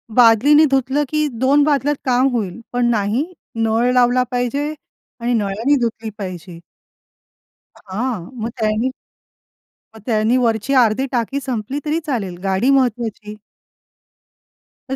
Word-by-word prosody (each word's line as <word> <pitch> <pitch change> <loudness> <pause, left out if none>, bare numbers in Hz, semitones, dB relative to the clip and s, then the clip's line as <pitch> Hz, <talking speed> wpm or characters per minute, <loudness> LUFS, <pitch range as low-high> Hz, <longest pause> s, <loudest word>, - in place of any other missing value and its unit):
बादलीनी 250 +6 +6
धुतलं 270 +2 +1
की 305 0 +1
2 280 +3 +4
बादल्यात 290 0 +1
काम 255 0 +3
होईल. 215 -2 -3
पण 245 -1 +1
नाही 220 +5 0 0.3
नळ 225 +2 +1
लावला 250 0 +3
पाहिजे 265 +5 -1 0.5
आणि 240 +1 0
नळाने 220 +5 +1
धुतली 225 -1 -2
पाहिजे. 180 -4 -7 1.2
हां, 210 -1 -4
मग 225 +1 -3
त्यांनी 215 +3 +1 1.1
मग - - -11
त्यांनी 225 +1 +2
वरची 230 +1 0
अर्धी 250 0 +3
टाकी 255 +2 -1
संपली 255 +2 -3
तरी 305 +2 0
चालेल 205 - -3
गाडी 195 +6 +1
महत्वाची. 235 -5 0 1.5
तर 265 - -1
240 Hz, 120 wpm, -19 LUFS, 215-265 Hz, 1.5 s, बादलीनी